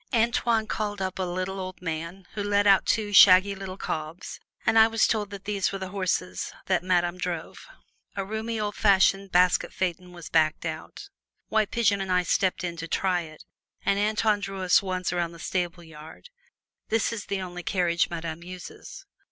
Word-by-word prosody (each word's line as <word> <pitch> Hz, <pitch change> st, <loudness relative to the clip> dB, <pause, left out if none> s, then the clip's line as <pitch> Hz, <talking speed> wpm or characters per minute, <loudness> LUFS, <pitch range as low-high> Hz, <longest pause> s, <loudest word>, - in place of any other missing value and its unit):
Antoine 230 Hz, -1 st, +2 dB
called 210 Hz, -1 st, -3 dB
up 190 Hz, 0 st, -3 dB
a -, -, 0 dB
little 185 Hz, +2 st, -3 dB
old 185 Hz, -1 st, -6 dB
man, 170 Hz, +2 st, -5 dB
who 210 Hz, -, -4 dB
led 205 Hz, 0 st, +2 dB
out 195 Hz, -1 st, +5 dB
two 210 Hz, -2 st, 0 dB
shaggy 190 Hz, 0 st, +8 dB
little 190 Hz, -1 st, -7 dB
cobs, 155 Hz, +1 st, -5 dB, 0.3 s
and 225 Hz, -, +4 dB
I 220 Hz, -, +8 dB
was 225 Hz, -1 st, +2 dB
told 210 Hz, -3 st, 0 dB
that 200 Hz, -1 st, -9 dB
these 205 Hz, -2 st, 0 dB
were 195 Hz, -, -3 dB
the 190 Hz, -1 st, -6 dB
horses 180 Hz, -, -2 dB
that 185 Hz, -2 st, +1 dB
Madame 175 Hz, -1 st, 0 dB
drove. 180 Hz, -, -5 dB, 0.5 s
A 195 Hz, -1 st, -2 dB
roomy, 220 Hz, +2 st, -3 dB
old 210 Hz, -1 st, -2 dB
fashioned 195 Hz, -1 st, +3 dB
basket 180 Hz, 0 st, +3 dB
phaeton 180 Hz, -1 st, -3 dB
was 175 Hz, -2 st, -10 dB
backed 155 Hz, 0 st, +1 dB
out; 160 Hz, -, -7 dB, 0.4 s
White 220 Hz, -2 st, +2 dB
Pigeon 205 Hz, -4 st, +2 dB
and 190 Hz, -1 st, -3 dB
I 180 Hz, 0 st, +3 dB
stepped 185 Hz, +1 st, 0 dB
in 170 Hz, -1 st, -4 dB
to 165 Hz, 0 st, -5 dB
try 180 Hz, 0 st, 0 dB
it, 155 Hz, -2 st, -11 dB, 0.4 s
and 200 Hz, -, +2 dB
Antoine 215 Hz, 0 st, +2 dB
drew 195 Hz, -1 st, -5 dB
us 180 Hz, -, +5 dB
once 185 Hz, -2 st, -2 dB
around 170 Hz, -1 st, -1 dB
the -, -, -11 dB
stable 175 Hz, 0 st, -3 dB
yard. 160 Hz, -, -13 dB, 0.6 s
This 225 Hz, 0 st, +1 dB
is 215 Hz, -3 st, -6 dB
the 200 Hz, -, -2 dB
only 180 Hz, -1 st, -6 dB
carriage 175 Hz, 0 st, +1 dB
Madame 165 Hz, -1 st, -5 dB
uses. 185 Hz, -, -10 dB
185 Hz, 185 wpm, -26 LUFS, 175-205 Hz, 0.6 s, shaggy